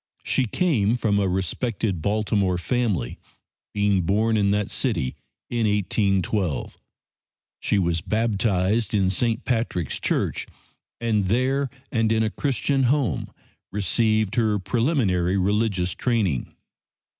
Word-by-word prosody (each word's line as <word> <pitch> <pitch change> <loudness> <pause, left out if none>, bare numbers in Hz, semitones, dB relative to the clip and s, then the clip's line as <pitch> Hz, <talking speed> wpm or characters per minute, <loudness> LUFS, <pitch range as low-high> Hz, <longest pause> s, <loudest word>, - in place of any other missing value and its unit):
She 130 - +1
came 120 - +1
from 105 -4 +1
a 100 -2 +1
respected 95 +1 -1
Baltimore 100 -2 +1
family, 95 - -1 0.5
being 100 -2 +2
born 105 +6 +1
in 100 -2 +2
that 105 0 0
city 65 - -1 0.3
in 115 -2 0
1812. 100 -4 0 0.8
She - - +1
was 85 -3 +1
baptized 110 0 0
in 95 -2 +2
St. 115 +5 0
Patrick's 115 - -1
Church, - - -1 0.5
and 110 -4 +1
there 130 +6 +1 0.2
and 115 -4 +1
in 110 0 +2
a 110 - 0
Christian 135 +1 0
home 135 0 0 0.4
received 110 +1 +1
her 110 -3 +2
preliminary 100 - +1
religious 100 -2 +1
training. 105 - -1
105 Hz, 115 wpm, -24 LUFS, 95-115 Hz, 0.8 s, being